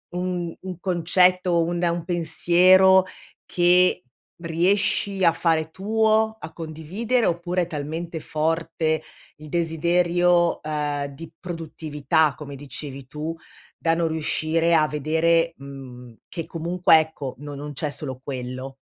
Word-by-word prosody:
un 180 Hz, -2 st, -3 dB
un 185 Hz, -2 st, -7 dB
concetto, 180 Hz, 0 st, +2 dB
un 175 Hz, +1 st, -2 dB
un 170 Hz, -1 st, 0 dB
pensiero 185 Hz, +2 st, +5 dB, 0.4 s
che 180 Hz, +1 st, +3 dB, 0.4 s
riesci 185 Hz, +3 st, 0 dB
a 170 Hz, -, +6 dB
fare 160 Hz, -1 st, 0 dB
tuo, 220 Hz, +3 st, +1 dB
a 160 Hz, -, -8 dB
condividere, 180 Hz, +10 st, -2 dB
oppure 175 Hz, +1 st, 0 dB
è 170 Hz, -, -2 dB
talmente 160 Hz, +1 st, -5 dB
forte 160 Hz, 0 st, -1 dB, 0.4 s
il 155 Hz, -, -12 dB
desiderio, 175 Hz, +1 st, +2 dB
uhm, 150 Hz, -2 st, -2 dB
di 155 Hz, +4 st, -11 dB
produttività 160 Hz, -3 st, -1 dB
come 145 Hz, -2 st, -9 dB
dicevi 135 Hz, -1 st, -7 dB
tu, 150 Hz, +4 st, -5 dB, 0.4 s
da 165 Hz, 0 st, +1 dB
non 165 Hz, -1 st, 0 dB
riuscire 160 Hz, +1 st, +1 dB
a 155 Hz, -1 st, +4 dB
vedere, 165 Hz, +3 st, +1 dB
mhmm, 130 Hz, -3 st, -11 dB
che 165 Hz, -3 st, -6 dB
comunque 170 Hz, 0 st, +3 dB
ecco, 155 Hz, -4 st, -5 dB
no 145 Hz, 0 st, -7 dB
non 145 Hz, +1 st, -7 dB
c'è 145 Hz, +2 st, -1 dB
solo 130 Hz, -3 st, -4 dB
quello? 130 Hz, 0 st, -6 dB
165 Hz, 125 wpm, -23 LUFS, 150-175 Hz, 0.4 s, a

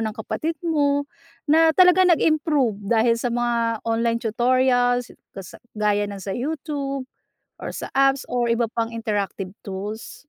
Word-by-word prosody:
ng 220 Hz, -1 st, -3 dB
kapatid 315 Hz, +8 st, -3 dB
mo, 285 Hz, -3 st, +1 dB, 0.4 s
na 320 Hz, +2 st, +4 dB
talaga 365 Hz, 0 st, +6 dB
nag-improve 300 Hz, -, +2 dB
dahil 230 Hz, +1 st, +2 dB
sa 245 Hz, -, -1 dB
mga 235 Hz, -2 st, -1 dB
online 230 Hz, 0 st, 0 dB
tutorials 245 Hz, +1 st, +1 dB, 0.3 s
sa 190 Hz, -2 st, -10 dB, 0.2 s
gaya 205 Hz, -1 st, +1 dB
ng 200 Hz, -1 st, -7 dB
sa 195 Hz, 0 st, -5 dB
YouTube, 275 Hz, -1 st, -4 dB, 0.5 s
or -, -, -6 dB
sa -, -, -6 dB
apps 275 Hz, 0 st, +2 dB
or 245 Hz, -1 st, 0 dB
iba 230 Hz, 0 st, +2 dB
pang 230 Hz, 0 st, -2 dB
interactive 205 Hz, -4 st, -3 dB
tools? 205 Hz, +3 st, -6 dB
240 Hz, 140 wpm, -22 LUFS, 220-285 Hz, 0.5 s, talaga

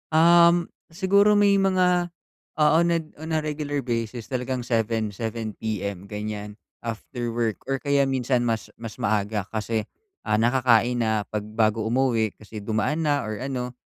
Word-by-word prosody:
Um, 170 Hz, +1 st, +5 dB, 0.2 s
siguro 200 Hz, +4 st, +4 dB
may 200 Hz, -1 st, +5 dB
mga 180 Hz, -2 st, +2 dB, 0.5 s
oo 150 Hz, +1 st, +5 dB
nag 165 Hz, -2 st, -1 dB
on 160 Hz, +2 st, -7 dB
a 160 Hz, -, +2 dB
regular 150 Hz, -1 st, -3 dB
basis 115 Hz, -2 st, -3 dB
talagang 130 Hz, 0 st, -2 dB
7:00, 115 Hz, -2 st, 0 dB
7:00 110 Hz, +1 st, -5 dB
PM 100 Hz, -4 st, -4 dB
ganiyan, 105 Hz, 0 st, -6 dB, 0.2 s
after 120 Hz, +1 st, -4 dB
work 115 Hz, -2 st, -2 dB
or 135 Hz, 0 st, -2 dB
kaya 140 Hz, 0 st, +2 dB
minsan 130 Hz, -2 st, 0 dB
mas 115 Hz, -2 st, -1 dB
mas 115 Hz, -1 st, -9 dB
maaga 105 Hz, -1 st, -1 dB
kasi, 110 Hz, 0 st, -2 dB, 0.4 s
ah, 105 Hz, -, +2 dB
nakakain 120 Hz, +1 st, +3 dB
na 110 Hz, -2 st, +1 dB
'pag 105 Hz, -1 st, -3 dB
bago 110 Hz, 0 st, +1 dB
umuwi 115 Hz, -3 st, +1 dB
kasi 110 Hz, 0 st, -10 dB
dumaan 110 Hz, +10 st, -1 dB
na 145 Hz, -1 st, +1 dB
or 110 Hz, -1 st, -5 dB
ano. 125 Hz, -1 st, -3 dB
120 Hz, 150 wpm, -24 LUFS, 110-150 Hz, 0.5 s, Um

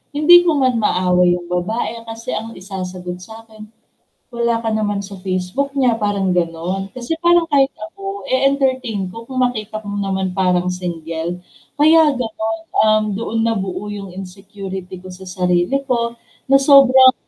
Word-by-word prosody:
hindi 305 Hz, +4 st, +7 dB
ko 325 Hz, -, +3 dB
man 255 Hz, -4 st, +2 dB
maaway 180 Hz, -3 st, +3 dB
yung 175 Hz, 0 st, -8 dB
babae 220 Hz, +6 st, -2 dB
kasi 225 Hz, +2 st, -6 dB
ang 225 Hz, +1 st, -5 dB
isasagot 185 Hz, -2 st, -6 dB
sa'kin, 220 Hz, +2 st, -12 dB, 0.6 s
"Wala 235 Hz, -1 st, 0 dB
ka 225 Hz, -, 0 dB
naman 205 Hz, -2 st, -1 dB
sa 200 Hz, 0 st, -9 dB
Facebook 185 Hz, +9 st, -2 dB
niya," 255 Hz, -4 st, +3 dB
parang 200 Hz, -3 st, 0 dB
ganon. 175 Hz, +3 st, -2 dB
Kasi 255 Hz, +6 st, -3 dB
parang 345 Hz, -1 st, +4 dB
kahit 275 Hz, -1 st, +4 dB, 0.2 s
ako 395 Hz, 0 st, -7 dB
e-entertain 260 Hz, -6 st, +1 dB
ko 230 Hz, +6 st, -9 dB
kung 255 Hz, +2 st, -5 dB
makita 220 Hz, -4 st, -1 dB
mo 200 Hz, -, -4 dB
naman 190 Hz, -1 st, -2 dB
parang 180 Hz, -1 st, +1 dB
single. 170 Hz, -1 st, -4 dB, 0.4 s
Kaya 315 Hz, 0 st, +6 dB
ganon, 305 Hz, +7 st, -3 dB, 0.2 s
um, 215 Hz, 0 st, +4 dB
doon 225 Hz, +1 st, -3 dB
nabuo 195 Hz, -3 st, -2 dB
yung 200 Hz, -2 st, -7 dB
insecurity 190 Hz, 0 st, -8 dB
ko 185 Hz, -, -12 dB
sa 185 Hz, +1 st, -10 dB
sarili 180 Hz, +6 st, 0 dB
ko 235 Hz, -2 st, -1 dB, 0.3 s
na 275 Hz, -, +7 dB
sobrang 265 Hz, -2 st, +7 dB
215 Hz, 150 wpm, -18 LUFS, 185-255 Hz, 0.6 s, hindi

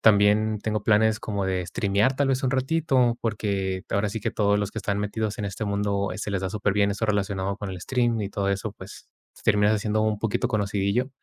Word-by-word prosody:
También 105 Hz, 0 st, +4 dB
tengo 105 Hz, -1 st, -1 dB
planes 110 Hz, +1 st, +3 dB
como 100 Hz, -2 st, -2 dB
de 90 Hz, -1 st, -1 dB
Streamear 100 Hz, +7 st, +1 dB
tal 140 Hz, -1 st, +2 dB
vez 130 Hz, 0 st, +1 dB
un 130 Hz, -, +1 dB
ratito, 130 Hz, -3 st, +2 dB
porque 100 Hz, -4 st, -1 dB
ahora 100 Hz, +1 st, +1 dB
sí 110 Hz, +1 st, -4 dB
que -, -, -1 dB
todos 105 Hz, -1 st, +2 dB
los 105 Hz, 0 st, -2 dB
que 110 Hz, -, -4 dB
están 100 Hz, 0 st, -1 dB
metidos 105 Hz, +1 st, -2 dB
en 105 Hz, -, -2 dB
este 100 Hz, +3 st, -4 dB
mundo 100 Hz, -1 st, 0 dB
se 105 Hz, +1 st, -4 dB
les 95 Hz, -, 0 dB
da 95 Hz, -, -2 dB
super 100 Hz, -1 st, 0 dB
bien 100 Hz, 0 st, +2 dB
eso 105 Hz, +3 st, -1 dB
relacionado 100 Hz, -1 st, -1 dB
con 100 Hz, -1 st, -5 dB
el 90 Hz, -1 st, -7 dB
Stream 120 Hz, -1 st, 0 dB
y 100 Hz, -, -2 dB
todo 100 Hz, -1 st, -1 dB
eso, 100 Hz, +1 st, -2 dB
pues 95 Hz, -1 st, -12 dB, 0.4 s
terminas 105 Hz, 0 st, +4 dB
haciendo 110 Hz, +1 st, 0 dB
un 110 Hz, -1 st, 0 dB
poquito 110 Hz, -2 st, 0 dB
conocidillo. 105 Hz, +4 st, 0 dB
105 Hz, 220 wpm, -25 LUFS, 100-110 Hz, 0.4 s, También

